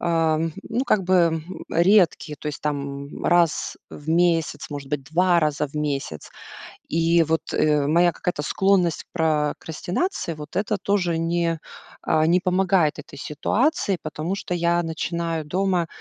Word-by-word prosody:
ам, 165 Hz, -1 st, +1 dB
ну, 255 Hz, +3 st, -2 dB
как 205 Hz, -7 st, +2 dB
бы, 185 Hz, +1 st, +2 dB
м, 170 Hz, 0 st, +1 dB
редкие, 170 Hz, -4 st, +3 dB
то -, -, -8 dB
есть 145 Hz, -, -6 dB
там, 140 Hz, -1 st, -3 dB
м, -, -, -9 dB
раз 170 Hz, -3 st, +2 dB
в 145 Hz, -, -11 dB
месяц, 165 Hz, -3 st, +1 dB
может 140 Hz, -2 st, -6 dB
быть, 145 Hz, -1 st, -2 dB
2 175 Hz, +3 st, +3 dB
раза 150 Hz, -1 st, 0 dB
в 140 Hz, -, -20 dB
месяц. 140 Hz, -, -3 dB, 0.6 s
И 165 Hz, +1 st, +3 dB
вот, 160 Hz, 0 st, 0 dB
э, 150 Hz, -2 st, +2 dB
моя 170 Hz, +4 st, +4 dB
какая-то 175 Hz, -4 st, -3 dB
склонность 185 Hz, +1 st, +1 dB
к -, -, -53 dB
прокрастинации, 160 Hz, -, -1 dB
вот 150 Hz, +3 st, -10 dB
это 210 Hz, +1 st, 0 dB
тоже 180 Hz, -5 st, 0 dB
не, 165 Hz, 0 st, 0 dB, 0.5 s
э, 155 Hz, 0 st, +3 dB
не, 175 Hz, +2 st, +4 dB
помогает 185 Hz, -3 st, +2 dB
этой -, -, -10 dB
ситуации, 205 Hz, -, 0 dB
потому 155 Hz, +4 st, -3 dB
что 180 Hz, -, -4 dB
я 170 Hz, 0 st, +1 dB
начинаю 165 Hz, 0 st, -3 dB
дома, 180 Hz, +2 st, 0 dB
165 Hz, 155 wpm, -23 LUFS, 150-180 Hz, 0.6 s, моя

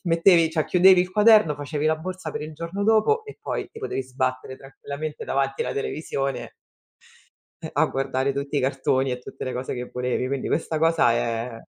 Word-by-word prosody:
mettevi 165 Hz, -1 st, +4 dB
cioè 160 Hz, -2 st, 0 dB
chiudevi 185 Hz, +1 st, +6 dB
il 180 Hz, 0 st, -1 dB
quaderno, 210 Hz, -5 st, +5 dB
facevi 145 Hz, +1 st, -4 dB
la 155 Hz, 0 st, +2 dB
borsa 180 Hz, 0 st, -6 dB
per -, -, -5 dB
il 155 Hz, 0 st, -7 dB
giorno 170 Hz, +6 st, -4 dB
dopo 225 Hz, -, +3 dB
e 430 Hz, -, -10 dB
poi 435 Hz, -, -4 dB
ti 445 Hz, -, -12 dB
potevi 135 Hz, -, -3 dB
sbattere 130 Hz, 0 st, -3 dB
tranquillamente 140 Hz, +3 st, -7 dB
davanti 135 Hz, 0 st, 0 dB
alla -, -, -3 dB
televisione 140 Hz, -2 st, -3 dB, 1.1 s
eh, -, -, -5 dB
a -, -, +3 dB
guardare 135 Hz, 0 st, -1 dB
tutti 140 Hz, +1 st, -3 dB
i -, -, +3 dB
cartoni 130 Hz, 0 st, 0 dB
e 125 Hz, -, -3 dB
tutte 125 Hz, -, -9 dB
le 130 Hz, -, -3 dB
cose 125 Hz, +1 st, -4 dB
che 125 Hz, 0 st, -6 dB
volevi. 125 Hz, 0 st, -1 dB
Quindi 135 Hz, 0 st, -3 dB
questa 160 Hz, -1 st, -1 dB
cosa 165 Hz, -5 st, +3 dB
è 115 Hz, 0 st, -2 dB
145 Hz, 190 wpm, -24 LUFS, 130-170 Hz, 1.1 s, chiudevi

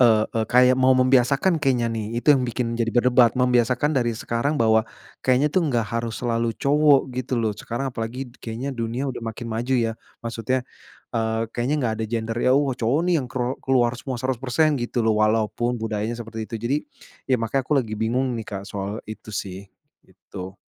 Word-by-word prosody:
eee, 110 Hz, -3 st, +5 dB
eee, 110 Hz, -1 st, +1 dB
kayak 125 Hz, +1 st, +5 dB
mau 130 Hz, 0 st, +5 dB
membiasakan 135 Hz, +7 st, +3 dB
kayaknya 125 Hz, -4 st, +2 dB
nih 115 Hz, +1 st, -3 dB
itu -, -, +5 dB
yang 130 Hz, -, +1 dB
bikin 120 Hz, 0 st, -2 dB
jadi 115 Hz, -, +1 dB
berdebat. 120 Hz, -1 st, +4 dB
Membiasakan 125 Hz, +2 st, +2 dB
dari 120 Hz, -2 st, +1 dB
sekarang 115 Hz, +7 st, -1 dB
bahwa 110 Hz, 0 st, +4 dB, 0.4 s
kayaknya 130 Hz, +3 st, +3 dB
tuh 180 Hz, -3 st, +2 dB
enggak 120 Hz, -6 st, +1 dB
harus 115 Hz, -1 st, -2 dB
selalu 115 Hz, -1 st, 0 dB
cowok 145 Hz, -2 st, +3 dB
gitu 130 Hz, 0 st, -2 dB
loh, 110 Hz, -2 st, 0 dB
sekarang 120 Hz, +5 st, -4 dB
apalagi 120 Hz, +3 st, -5 dB
kayaknya 120 Hz, +4 st, -4 dB
dunia 120 Hz, +2 st, -3 dB
udah 125 Hz, -, -6 dB
makin 115 Hz, +1 st, -5 dB
maju 120 Hz, +4 st, -1 dB
ya. 115 Hz, -2 st, +1 dB, 0.3 s
Maksudnya, 115 Hz, +2 st, -1 dB, 0.5 s
eee, 110 Hz, 0 st, 0 dB
kayaknya 125 Hz, +5 st, -1 dB
nggak 110 Hz, -2 st, 0 dB
ada -, -, 0 dB
gender, 115 Hz, 0 st, -2 dB
yang, 125 Hz, +2 st, +3 dB
oh, 140 Hz, -2 st, 0 dB
cowok 125 Hz, +5 st, +1 dB
nih 180 Hz, -, +3 dB
yang 130 Hz, -, -5 dB
ker 125 Hz, +1 st, -2 dB
keluar 125 Hz, -3 st, +3 dB
semua 130 Hz, 0 st, -4 dB
100% 130 Hz, +4 st, +1 dB
gitu 120 Hz, 0 st, -1 dB
loh, 110 Hz, -1 st, +2 dB
walaupun 110 Hz, +3 st, +1 dB
budayanya 110 Hz, +1 st, -2 dB
seperti 115 Hz, -1 st, -6 dB
itu. 120 Hz, -, -7 dB
Jadi 120 Hz, +5 st, 0 dB, 0.5 s
ya 130 Hz, -, +4 dB
makanya 115 Hz, +4 st, 0 dB
aku 150 Hz, -, +1 dB
lagi 115 Hz, -5 st, -2 dB
bingung 125 Hz, +4 st, 0 dB
nih 110 Hz, -, -6 dB
Kak 100 Hz, -1 st, -5 dB
soal 100 Hz, +2 st, -4 dB
itu 110 Hz, 0 st, -9 dB
sih 95 Hz, 0 st, -5 dB, 0.4 s
itu. -, -, -22 dB
Gitu. 95 Hz, +1 st, -9 dB
120 Hz, 190 wpm, -23 LUFS, 115-130 Hz, 0.5 s, eee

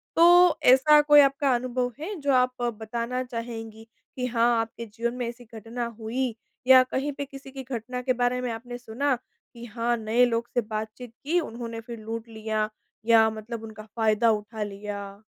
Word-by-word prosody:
तो, 350 Hz, +1 st, +7 dB
ऐसा 280 Hz, +4 st, +7 dB
कोई 295 Hz, 0 st, +6 dB
आपका 275 Hz, -1 st, +2 dB
अनुभव 250 Hz, 0 st, -1 dB
है, 390 Hz, +7 st, -5 dB
जो 285 Hz, -1 st, +1 dB
आप 255 Hz, 0 st, +3 dB
अ, 240 Hz, -, +1 dB
बताना 235 Hz, +3 st, -4 dB
चाहेंगी 225 Hz, -2 st, -7 dB, 0.3 s
कि 250 Hz, -, -2 dB
हाँ, 235 Hz, -1 st, +2 dB
आपके 230 Hz, +1 st, -6 dB
जीवन 230 Hz, +2 st, -3 dB
में 245 Hz, -2 st, -3 dB
ऐसी 240 Hz, +1 st, -8 dB
घटना 230 Hz, +2 st, -5 dB
हुई? 235 Hz, +2 st, -2 dB, 0.3 s
या 260 Hz, -1 st, +9 dB
कहीं 265 Hz, +3 st, -2 dB
पे 280 Hz, -, -5 dB
किसी 275 Hz, 0 st, -12 dB
की 270 Hz, 0 st, -7 dB
घटना 250 Hz, 0 st, -5 dB
के 255 Hz, 0 st, +1 dB
बारे 245 Hz, 0 st, 0 dB
में 250 Hz, -2 st, -2 dB
आपने 245 Hz, +2 st, -7 dB
सुना 250 Hz, +3 st, -1 dB, 0.4 s
कि 240 Hz, 0 st, -10 dB
हाँ, 235 Hz, +1 st, -1 dB
नए 225 Hz, +3 st, +3 dB
लोग 235 Hz, -1 st, -1 dB
से 245 Hz, -, +2 dB
बातचीत 220 Hz, +2 st, -6 dB
की, 335 Hz, +5 st, +2 dB
उन्होंने 230 Hz, -6 st, -6 dB
फिर 235 Hz, 0 st, -9 dB
लूट 225 Hz, +1 st, -6 dB
लिया? 220 Hz, -1 st, -2 dB, 0.4 s
या 225 Hz, -1 st, +6 dB
मतलब 220 Hz, +1 st, -7 dB
उनका 220 Hz, -1 st, -9 dB
फ़ायदा 225 Hz, 0 st, +3 dB
उठा 215 Hz, +1 st, -3 dB
लिया? 200 Hz, -1 st, -7 dB
235 Hz, 185 wpm, -26 LUFS, 225-255 Hz, 0.4 s, या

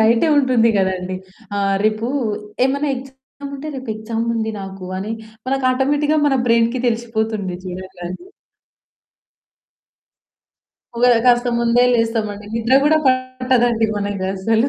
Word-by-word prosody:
నైటే 230 Hz, +8 st, +4 dB
ఉంటుంది 255 Hz, -4 st, +3 dB
కదండీ. 185 Hz, -1 st, -1 dB, 0.4 s
ఆహ్, 195 Hz, -1 st, +1 dB
రేపు 215 Hz, +2 st, +1 dB, 0.6 s
ఏమైనా 280 Hz, +2 st, 0 dB
ఎక్సామ్ 270 Hz, +2 st, -11 dB
ఉంటే 305 Hz, +3 st, -7 dB
రేపు 260 Hz, -1 st, -8 dB
ఎక్సామ్ 225 Hz, +1 st, -3 dB
ఉంది 220 Hz, -1 st, -1 dB
నాకు 195 Hz, -1 st, -8 dB
అని 210 Hz, +3 st, -4 dB, 0.3 s
మనకి 270 Hz, 0 st, -1 dB
ఆటోమేటిక్‌గా 290 Hz, +4 st, +1 dB
మన 275 Hz, -, +3 dB
బ్రెయిన్‌కి 230 Hz, +2 st, +3 dB
తెలిసిపోతుంది 220 Hz, -5 st, -2 dB
చూడండి. 185 Hz, -, -7 dB, 2.7 s
ఒకేళ 245 Hz, +1 st, +5 dB
కాస్త 245 Hz, 0 st, +4 dB
ముందే 235 Hz, +1 st, +3 dB
లేస్తామండి 220 Hz, -3 st, -1 dB
నిద్ర 230 Hz, +3 st, +1 dB
కూడా 310 Hz, +1 st, +4 dB
పట్టదండి 255 Hz, -3 st, +2 dB
మనకస్సలు 200 Hz, +4 st, 0 dB
230 Hz, 110 wpm, -19 LUFS, 205-255 Hz, 2.7 s, ఒకేళ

